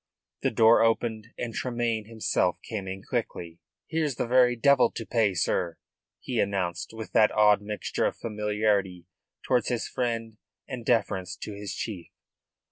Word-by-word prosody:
The - - +2
door 115 +1 +5
opened, 115 -1 +1
and 120 -1 -4
Tremayne 120 -3 -1
himself 110 -5 0
came 105 -4 -4
in 95 +1 -6
quickly. 90 -9 -4 0.3
"Here's 155 -4 -1
the - - -1
very 125 0 +4
devil 135 0 +4
to 115 - -6
pay, 105 -5 +1
sir," 85 0 0 0.4
he 125 -3 -3
announced, 95 -4 -1
with 110 -1 -8
that 105 - +5
odd 105 -1 +5
mixture 105 0 -2
of - - -4
familiarity 105 -4 -1 0.4
towards 125 -4 +1
his 120 -2 -1
friend 115 -3 -3 0.3
and 125 -3 -6
deference 100 -6 0
to 105 - -5
his 100 -1 -6
chief. 95 -6 -5
110 Hz, 150 wpm, -27 LUFS, 100-120 Hz, 0.4 s, door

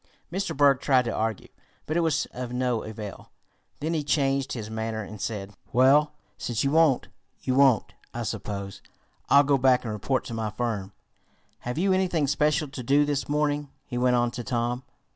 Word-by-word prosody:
Mr. 190 -4 -2
Berg 140 -2 +5
tried 130 -3 +3
to 115 - -2
argue, 110 -2 -2 0.4
but 155 - -3
it - - +3
was 160 -3 +1
of 125 -1 -6
no 125 -2 0
avail. 105 -2 -8 0.5
Then 160 +3 -1
he 155 -2 0
changed 135 -2 +1
his 110 -4 -5
manner, 110 0 -3
and 100 +1 -9
said: 100 -2 -4 0.2
"Well, 140 +5 +5 0.3
since 115 -4 -1
you 140 - +1
won't, 155 -4 +3 0.3
you 130 - 0
won't, 135 -5 +4 0.2
I - - -4
suppose. 100 -1 -5 0.5
I'll 140 +1 +7
go 140 -1 +2
back 125 -1 +4
and 110 -3 -3
report 130 +5 -1
to 125 - -6
my 110 -1 -2
firm. 105 -3 -3 0.7
Have 125 +2 -5
you 190 +3 +2
anything 180 -5 +1
special 150 +3 +1
to 135 -2 -7
do 140 +4 +3
this 145 -1 -2
morning?" 145 -1 0 0.2
he 120 -2 -4
went 125 0 +3
on 120 0 +2
to 120 - -5
Tom. 120 0 -1
130 Hz, 185 wpm, -26 LUFS, 115-145 Hz, 0.7 s, I'll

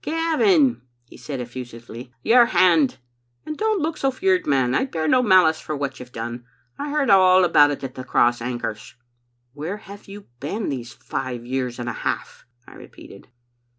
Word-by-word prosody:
" - - -46
'Gavin,' 325 - +2 0.2
he - - -17
said 140 -3 -7
eflEusively, 120 0 -9
'your 240 0 +5
hand. 165 - +3 0.5
And 310 - -5
don't 430 -2 0
look 315 0 -2
so 270 - +1
feared, 370 +8 0
man; 130 -3 +2
I 265 - +1
bear 160 -11 -3
no 255 +6 +4
malice 185 -8 +4
for 155 - -5
what 140 -1 -4
you*ve 125 0 -11
done. 120 +1 -6 0.4
I 290 +1 -4
heard 285 -5 +1
all 185 -1 +6
about 145 -4 +5
it 145 -1 -4
at 130 -1 -5
the 130 - -8
Cross 120 -1 +2
Anchors. 120 -1 -5 0.2
' 120 0 -47
" 120 0 -47
'Where 160 +8 -5
have 200 -1 -13
you 200 +1 -11
been 200 +10 -3
these 125 -4 -5
five 125 -3 -6
years 125 -1 -3
and 120 - -5
a - - -2
half?* - - -5 0.2
I - - -13
repeated. 100 - -14
145 Hz, 190 wpm, -22 LUFS, -, 0.5 s, all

